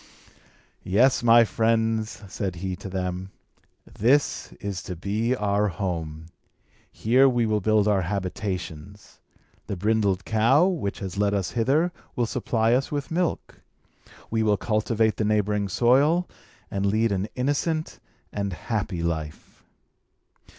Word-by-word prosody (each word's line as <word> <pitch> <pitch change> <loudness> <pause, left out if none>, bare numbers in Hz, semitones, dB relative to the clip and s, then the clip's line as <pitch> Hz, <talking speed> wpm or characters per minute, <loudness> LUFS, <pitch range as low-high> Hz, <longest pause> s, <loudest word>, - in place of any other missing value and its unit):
"Yes, 120 +8 +3
my 120 0 +7
friends," 110 0 0
said 95 -1 -4
he 95 +1 -4
to 95 - -8
them, 90 0 -3 0.6
"this 135 +7 +1
is 100 -2 -5
to 90 - -6
be 105 +8 -1
our 105 -2 +1
home. 80 -4 -4 0.7
Here 130 +5 +4
we 120 -2 +1
will 105 -1 0
build 105 +1 +3
our 100 -2 +3
habitations. 95 -1 -5 0.5
The 100 - -3
brindled 100 -1 +1
cow, 115 +9 +4
which 170 - -1
has 95 0 -5
led 105 0 +2
us 95 -3 -1
hither, 140 +9 +1 0.2
will 120 - +1
supply 115 0 0
us 130 +2 0
with 145 0 -3
milk. 175 0 -2 0.7
We 110 0 +1
will 105 -2 +2
cultivate 110 +1 0
the - - 0
neighbouring 105 -1 +1
soil, 140 - +3 0.4
and 100 0 -2
lead 110 +2 +2
an 100 +1 -1
innocent 145 +5 -1 0.3
and 100 -2 -2
happy 95 -1 -3
life." 80 -3 -5
105 Hz, 130 wpm, -25 LUFS, 95-120 Hz, 0.7 s, my